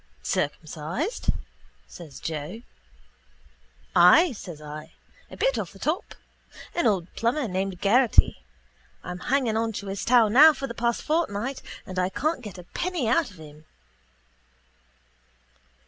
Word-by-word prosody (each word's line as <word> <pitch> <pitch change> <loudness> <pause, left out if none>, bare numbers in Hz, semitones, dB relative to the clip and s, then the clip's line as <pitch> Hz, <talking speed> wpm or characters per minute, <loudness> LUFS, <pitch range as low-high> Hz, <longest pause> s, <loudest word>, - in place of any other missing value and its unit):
—Circumcised? 155 - -3 0.6
says 150 -7 -11
Joe. 160 - -5 1.3
—Ay, 280 - +7
says 180 -9 -9
I. 150 +1 -9 0.4
A - - -11
bit - - +1
off - - -5
the - - -14
top. - - -2 0.6
An 345 - +1
old 185 -5 0
plumber 245 +4 0
named 190 -1 -3
Geraghty. 235 +5 +4 0.6
I'm 180 0 -6
hanging 250 +1 0
on 225 0 -1
to 205 - -6
his 195 0 -4
taw 240 -2 +5
now 290 +9 +8
for 275 - -5
the 235 - -6
past 235 0 -1
fortnight 270 -5 -1 0.2
and 185 0 -4
I 180 0 +1
can't 305 - -1
get 210 -5 -9
a 180 - -9
penny 340 - -3
out 285 +8 +2
of 185 - -16
him. 155 0 -13
210 Hz, 135 wpm, -26 LUFS, 175-260 Hz, 1.3 s, now